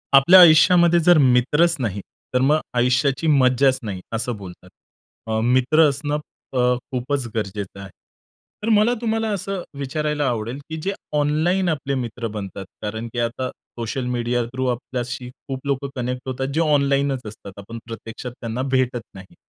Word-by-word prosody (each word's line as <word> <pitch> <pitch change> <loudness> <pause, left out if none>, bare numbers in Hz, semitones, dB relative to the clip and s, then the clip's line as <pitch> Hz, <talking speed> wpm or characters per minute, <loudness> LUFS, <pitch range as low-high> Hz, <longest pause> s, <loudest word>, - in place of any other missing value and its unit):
आपल्या 170 +8 +8
आयुष्यामध्ये 175 +1 +7
जर 175 +1 +5
मित्रच 145 +5 +4
नाही, 105 -5 -2 0.3
तर 125 - +2
मग 150 +4 +3 0.2
आयुष्याची 125 +5 +2
मज्जाच 130 -2 +4
नाही 100 -4 -5
असं 115 +1 -2
बोलतात. 90 -1 -11 0.6
अ, 110 0 0
मित्र 130 +6 +4
असणं 145 +2 -2 0.3
अ, 130 - 0 0.3
खूपच 130 +1 -2
गरजेचं 100 -2 -4
आहे. 100 - -9 0.7
तर 225 - 0
मला 215 +3 +4
तुम्हाला 225 -1 0
असं 195 -1 -3 0.2
विचारायला 150 +1 -2
आवडेल, 120 +2 -3
की 160 - -4
जे 195 - -1 0.3
ऑनलाईन 165 +6 +1
आपले 140 -3 -2
मित्र 120 -2 -4
बनतात 100 -1 -6 0.2
कारण 110 +2 -4
की 120 - -3
आता 125 +2 -2
सोशल 120 +2 -6
मीडिया 120 0 0
थ्रू 130 +2 -4
आपल्याशी 125 0 -5 0.2
खूप 135 0 -6
लोकं 140 0 -1
कनेक्ट 125 0 -3
होतात 130 +1 -2
जे 165 - +2
ऑनलाईनच 140 -3 +2
असतात. 105 -1 -10
आपण 110 +4 -9
प्रत्यक्षात 115 +1 -8
त्यांना 115 +1 -3
भेटत 125 -2 +1
नाही. 95 0 -13
130 Hz, 155 wpm, -22 LUFS, 120-150 Hz, 0.7 s, आपल्या